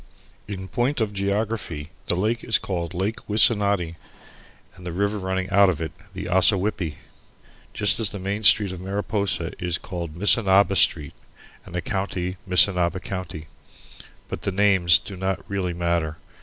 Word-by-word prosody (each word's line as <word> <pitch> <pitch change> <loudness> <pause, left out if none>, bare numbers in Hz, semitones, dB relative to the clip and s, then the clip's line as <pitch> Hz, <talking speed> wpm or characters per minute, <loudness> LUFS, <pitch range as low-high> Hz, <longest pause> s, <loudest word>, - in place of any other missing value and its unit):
In 95 -2 -6
point 125 +6 -1
of 110 -2 -1
geography 100 -6 -3 0.2
the - - +2
lake 110 +5 -1
is 110 - +2
called 85 -2 -4
Lake 100 +5 -2
Wissanotti 100 -6 +2 0.8
and 90 - -13
the 90 - -5
river 100 +4 -1
running 95 0 -2
out 100 0 +5
of 85 -5 -2
it 80 -1 -4 0.2
the 95 +3 -5
Ossawippi, 95 -3 +2 0.8
just 105 +2 +2
as 110 -3 0
the 100 - -7
main 100 +2 -3
street 100 -2 +5
of 90 -1 -8
Mariposa 100 -2 -2
is 90 -1 -1
called 85 -4 -7
Missinaba 100 0 +4
Street 75 -5 +2 0.5
and 90 - -10
the 85 - -2
county 95 -2 -3
Missinaba 90 -1 +4
County. 90 -5 -6 0.8
But - - -6
these 95 0 -3
names 95 -4 +5
do 100 - -9
not 95 +1 -3
really 95 -3 -2
matter. 85 -2 -2
95 Hz, 155 wpm, -23 LUFS, 90-100 Hz, 0.8 s, out